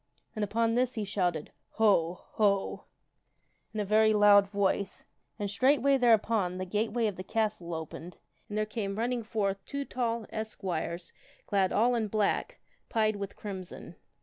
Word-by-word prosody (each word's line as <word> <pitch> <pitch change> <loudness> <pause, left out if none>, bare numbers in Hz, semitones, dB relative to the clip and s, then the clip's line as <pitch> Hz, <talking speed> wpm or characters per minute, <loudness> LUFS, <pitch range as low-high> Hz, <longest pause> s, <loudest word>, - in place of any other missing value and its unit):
And 215 - -1
upon 230 +2 +1
this 250 +1 +1
he 220 - -2
shouted, 180 -6 -1
" - - -49
Ho! 185 -6 +3
Ho! 200 -2 +1 0.4
" - - -45
in 220 - -4
a 210 - 0
very 215 +2 +4
loud 205 -1 +6
voice, 200 -1 -1 0.3
and 205 -2 -2
straightway 275 +6 +3
there 240 -3 +6
upon 205 -4 -1
the 185 - -3
gateway 220 +4 0
of 205 -4 -1
the 185 - -5
castle 205 -5 -1
opened 160 +2 -7 0.3
and 210 - -4
there 215 - +1
came 210 -2 -4
running 240 +2 0
forth 200 -3 -2
two 280 0 -4
tall 235 -4 -2
esquires 180 -5 -4 0.3
clad 195 -2 +1
all 240 +3 +3
in 225 -3 0
black, 215 - 0 0.3
pied 215 -2 +2
with 200 -1 -6
crimson. 190 -3 -8
210 Hz, 165 wpm, -30 LUFS, 195-225 Hz, 0.4 s, loud